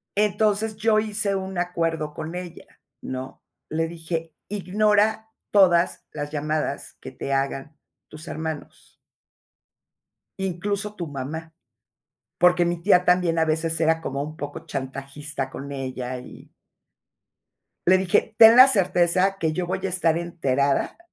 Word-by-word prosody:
Entonces, 210 +1 +1
yo 215 -1 +2
hice 210 -2 -1
un 190 -1 -4
acuerdo 165 -3 -1
con 160 +3 -6
ella, 180 -2 -8 0.4
¿no? 130 0 -7 0.3
Le 165 +1 -1
dije: 165 -1 -5
"Ignora 210 +2 +1 0.2
todas 180 -4 +4
las 145 0 -5
llamadas, 155 +1 -2
que - - -8
te 140 - -4
hagan 135 +2 -2 0.3
tus 155 +2 -11
hermanos" 160 -1 -6 1.5
"Incluso, 200 +3 -2
tu 175 -4 -5
mamá". 155 +4 -6 0.9
Porque 180 0 +5
mi 175 0 -1
tía, 180 -1 +4
también 180 -2 +2
a 160 - +4
veces, 160 +1 0
era 160 0 +3
como 140 -3 -3
un 155 +2 -7
poco 145 -1 -6
chantajista 135 +1 -5
con 140 +1 -8
ella, 130 -2 -4
y 125 - -13 1.4
le 185 +1 +6
dije: 190 +3 +1
"Ten 225 0 +9
la 255 +2 +10
certeza, 185 -2 +2
que 160 -1 +1
yo 180 +1 -2
voy 185 +1 -2
a - - 0
estar 170 -3 +1
enterada, 140 -5 0
170 Hz, 135 wpm, -24 LUFS, 150-190 Hz, 1.5 s, la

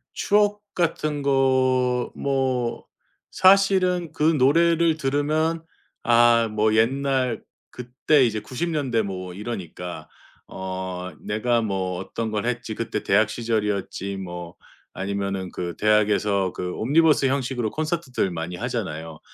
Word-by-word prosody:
추억 205 0 +2
같은 155 -4 -1
거 130 -2 +2
뭐 130 -3 -1 0.5
사실은 185 -3 +4
그 150 - -3
노래를 165 +2 +4
들으면 155 +3 0 0.4
아, 120 -1 +5
뭐 110 0 +1
옛날 130 +1 +1 0.3
그때 130 +3 +1
이제 110 -2 -1
90 130 +10 -4
년대 135 -8 0
뭐 95 -3 -5
이러니까 90 -4 -6 0.4
어 95 -1 -5
'내가 115 +3 0
뭐 95 -4 -2
어떤 110 +3 -4
걸 105 +1 -2
했지. 115 -2 -3
그때 110 -2 -3
대학 105 +2 +3
시절이었지.' 105 -4 -2
뭐 85 -2 -7 0.4
아니면은 100 -1 -3
그 85 -1 -5
대학에서 105 -3 +2
그 90 0 -4
옴니버스 150 +4 +3
형식으로 130 -4 -1
콘서트들 155 - -2
많이 85 +1 -5
하잖아요. 80 -2 -4
120 Hz, 240 characters per minute, -24 LUFS, 100-140 Hz, 0.5 s, 아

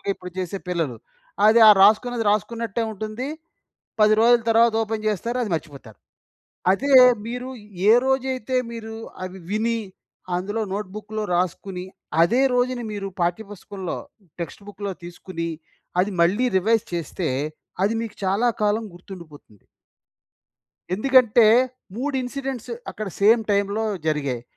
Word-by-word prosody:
నార్మల్‌గా - - -3
ఇప్పుడు 180 -1 -10
చేసే 185 +1 -3
పిల్లలు. 165 -9 -1 0.5
అది 220 +2 +6
ఆ - - +11
రాసుకున్నది 225 +3 +4
రాసుకున్నట్టే 230 +1 -1
ఉంటుంది. 215 +5 -5 0.7
10 215 0 +6
రోజుల 240 +1 +5
తర్వాత 230 +1 +5
ఓపెన్ 220 0 -4
చేస్తారు. 230 +4 -2
అది 220 - -3
మర్చిపోతారు. 140 - -7 0.7
అదే 275 +8 0 0.3
మీరు 245 +2 -5 0.4
ఏ - - +9
రోజైతే 260 -2 0 0.2
మీరు 225 -1 -7 0.3
అవి 185 +1 -7
విని, 225 +2 0 0.6
అందులో 205 +5 -2
నోట్‌బుక్‌లో 210 +2 -5
రాసుకొని, 180 +1 -2 0.4
అదే 235 +10 +3
రోజున 245 0 +1
మీరు 200 -1 -4
పాఠ్య 175 +5 0
పుస్తకంలో, 195 -2 -6 0.4
టెక్స్ట్ 170 +4 -6
బుక్‌లో 200 0 -5
తీసుకొని, 175 -1 -6 0.5
అది 195 +3 0
మళ్ళీ 200 +9 +2
రివైజ్ 225 +3 +2
చేస్తే, 170 0 -3 0.6
అది 210 +3 +1
మీకు 230 - -6
చాలా 200 +6 +2 0.2
కాలం 210 +2 +1
గుర్తుండిపోతుంది. 170 - -13 1.3
ఎందుకంటే, 240 +1 +5 0.5
3 275 +4 -2
ఇన్సిడెంట్స్ 260 -1 -5 0.2
అక్కడ 215 - -6
సేమ్ 225 +3 +5
టైమ్లో 200 +2 +1 0.2
జరిగాయి. 140 -6 -1
210 Hz, 120 wpm, -23 LUFS, 185-235 Hz, 1.3 s, ఆ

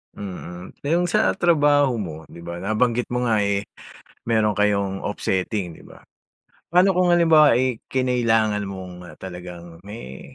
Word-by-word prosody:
Mm. 90 -2 -8
Eh, 145 - -3
'yung 175 +1 +1
sa 215 +4 +2
trabaho 145 -6 +3
mo, 85 -6 -5 0.2
'di - - -11
ba, 85 +1 -7
nabanggit 115 +4 0
mo 125 0 0
nga, 110 -3 +2
eh, 100 0 -1 0.6
meron 110 -2 +2
kayong 100 -1 0
offsetting, 95 -2 -2
'di - - -15
ba? - - -16 0.7
Pa'no 180 +3 +4
kung 180 -1 +2
halimbawa, 160 -5 +6
eh, 125 -1 0
kinailangan 115 -5 +1
mong, 95 -2 -7
ah, - - -13
talagang 90 -2 -9
me 105 - -10
110 Hz, 150 wpm, -22 LUFS, 95-130 Hz, 0.7 s, halimbawa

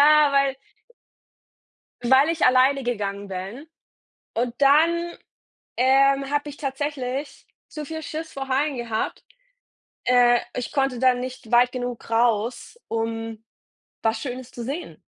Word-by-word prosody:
Ja, 300 0 +6
weil 275 -1 +2 1.5
weil 265 +4 +5
ich 330 -1 +1
alleine 260 +2 +4
gegangen 205 -4 -3
bin 195 - -7 0.7
und 235 +1 -1
dann, 335 +5 +3 0.6
ähm, 275 +2 +4
habe 290 0 0
ich 290 - -10
tatsächlich 275 -1 -4 0.2
zu 300 -1 -7
viel 320 +2 -6
Schiss 315 +1 -6
vor 270 -1 -5
Haien 275 +1 0
gehabt. 230 -2 -3 0.8
Äh, 245 -1 +5 0.2
ich 250 - -4
konnte 270 -3 0
da 255 0 +4
nicht 250 -1 -7
weit 245 +1 +5
genug 245 -2 -5
raus, 230 - 0
um 225 0 -3 0.6
was 225 0 +1
Schönes 255 -1 -6
zu 240 - -7
sehen. 285 +8 -6
255 Hz, 125 wpm, -24 LUFS, 240-280 Hz, 1.5 s, Ja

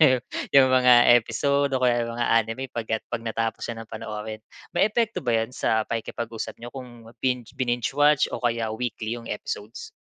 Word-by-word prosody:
niyo 150 - +7 0.5
'yong 130 -1 +8
mga 125 -2 +7
episode, 140 +4 0
o - - -2
kaya 120 -1 +3
'yong 115 - -6
mga 120 - 0
anime 115 +4 -1
pagka 110 -1 -2
'pag - - -1
natapos 115 -1 -2
niyo 115 -1 -5
ng - - -29
panoorin. 110 -1 -6 0.4
May 200 - +4
epekto 230 +1 0
ba 120 - +1
yan 115 - -14
sa 110 -4 +1
pakikipag-usap 115 0 -4
niyo 120 +1 -8
kung 120 -4 -10
binge 125 -3 -1
bininge-watch, 135 +3 +2
o - - -4
kaya 115 -2 -1
weekly 115 -1 -3
'yong 115 - -10
episodes? 460 0 -6
120 Hz, 180 wpm, -25 LUFS, 115-130 Hz, 0.5 s, yong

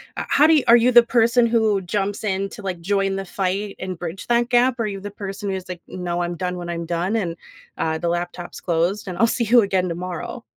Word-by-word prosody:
Uh, - - -3
how 295 +2 +5
do 320 - +6
you 295 - +3
are 235 - +9
you 240 +2 +3
the 240 0 +9
person 235 0 +3
who 220 -4 +2
jumps 200 +3 -2
in 195 -1 -1
to, 220 - -9
like, 185 -3 -4
join 195 +2 0
the 195 - -4
fight, 195 +2 -2
and 185 -2 -5
bridge 175 +2 -6
that 240 0 +2
gap? 245 0 +3
Are 225 - 0
you 195 -2 -5
the 205 +1 -6
person 200 0 -6
who's 190 -1 -4
like, 180 -2 -7
"No, 175 -1 -3
I'm 175 0 -3
done 180 0 -2
when 175 -1 -6
I'm 170 -1 -3
done, 175 +5 -1
and, 175 -6 -2 0.4
uh, 160 0 -1
the 170 +2 -3
laptop's 175 +1 -4
closed, 175 +4 0
and 180 - -6
I'll 230 - +4
see 235 - 0
you 235 +2 +5
again 190 -3 0
tomorrow?" 180 +7 -5
195 Hz, 245 wpm, -22 LUFS, 175-225 Hz, 0.4 s, are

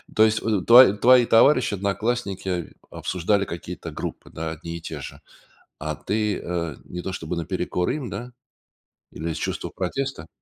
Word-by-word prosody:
То 110 - +6
есть, 110 0 +3
в 105 -4 0
твои 120 -3 +9
твои 125 +4 +6
товарищи, 125 +1 +5
одноклассники 100 -3 -2 0.2
обсуждали 100 +3 0
какие-то 85 -1 -7
группы, - - -6
да, 80 0 -5
одни 85 +1 -6
и - - -11
те 80 -2 -6
же. - - -9 0.6
А 75 0 -3
ты, 105 -1 -1
э, 85 -4 -3
не 90 - -6
то 95 - -4
чтобы 85 -1 -4
наперекор 85 +2 -2
им, 140 -6 -3
да? 120 +6 -6 0.8
Или 80 +2 -4
из 80 - -4
чувства - - -3
протеста? 95 -1 -4
95 Hz, 160 wpm, -24 LUFS, 85-110 Hz, 0.8 s, твои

